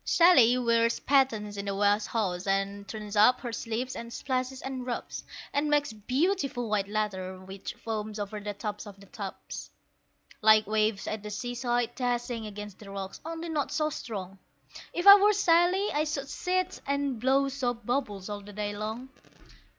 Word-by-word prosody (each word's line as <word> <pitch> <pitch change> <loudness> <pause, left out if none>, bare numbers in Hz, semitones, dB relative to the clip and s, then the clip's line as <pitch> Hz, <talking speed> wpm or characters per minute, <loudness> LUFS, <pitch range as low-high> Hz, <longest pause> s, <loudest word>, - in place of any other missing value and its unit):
Sally 260 -9 +6
wears 230 -1 +2
pattens 225 -7 +2
in 200 - -4
the 200 -1 -2
wash 205 +1 +3
house, 190 -5 -2
and 195 +1 -1
turns 210 0 -6
up 235 +5 +6
her 240 -3 -5
sleeves, 235 +3 -3
and 235 0 -7
splashes, 255 +1 -2
and 265 -1 -4
rubs, 245 -1 -4 0.3
And 295 +1 +1
makes 290 -4 +2
beautiful 260 - 0
white 205 -2 0
lather 195 -3 -2
which 190 +4 -8
foams 215 -2 -4
over 210 +1 -4
the 205 0 -5
tops 210 0 -5
of 200 -1 -11
the 200 - -14
tubs, 200 -1 -7 0.7
Like 215 0 +6
waves 215 -1 +1
at 215 -1 -3
the 210 - -7
seaside 245 +2 -1
dashing 240 -2 -2
against 210 -1 -8
the 205 - -11
rocks, 195 -1 -6
only 330 +1 -5
not 295 -3 -1
so 305 +1 0
strong. 195 -7 -6 0.5
If 350 - -3
I 400 0 +12
were 420 +1 +6
Sally 365 +1 +3
I 300 +1 +1
should 285 -3 -3
sit 370 +3 -1
and 280 -3 0
blow 270 +3 +3
soap 245 -4 -2
bubbles 210 -7 -2
all 205 -1 -5
the 205 +1 -12
day 205 0 -3
long. 220 +5 -5
230 Hz, 175 wpm, -29 LUFS, 205-270 Hz, 0.7 s, I